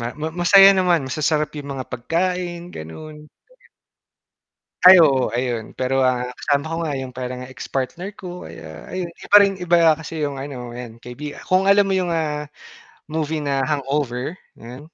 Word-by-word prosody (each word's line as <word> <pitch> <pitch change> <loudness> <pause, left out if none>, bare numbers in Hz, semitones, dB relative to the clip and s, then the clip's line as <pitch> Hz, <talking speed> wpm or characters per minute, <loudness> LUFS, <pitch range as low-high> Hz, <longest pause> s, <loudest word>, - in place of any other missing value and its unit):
ma 115 - -3
ma 155 - -2
masaya 195 +2 +8
naman, 180 -3 +3
masasarap 150 +2 0
'yong 140 -2 -6
mga 130 -1 -6
pagkain 175 +7 -2 0.2
gano'n. 150 - -10 1.6
Ay 185 +1 +10
oo 135 -6 +4
ayon 120 -2 -3
pero 130 +1 +1
ah 125 -1 +1
kasama 145 +1 -1
ko 165 +1 -4
nga 155 -3 -2
'yong 130 -1 -7
parang 125 0 -6
ex 130 -1 -10
partner 140 +9 -3
ko 180 -1 -8
ay - - -11 0.3
ayon 185 -2 -4
iba 205 - +3
rin 200 -1 +3
iba 170 -2 +4
kasi 160 +1 -8
'yong 140 -3 -3
ano 125 -4 -7 0.2
kaibigan, 125 +5 -8
kung 190 +1 +3
alam 200 0 +5
mo 195 - 0
'yong 185 -2 0
ah 150 -3 -2 0.6
movie 155 -1 -2
na 140 -1 0
hangover, 140 +1 -2 0.2
yan? 120 +3 -11
150 Hz, 160 wpm, -21 LUFS, 130-175 Hz, 1.6 s, Ay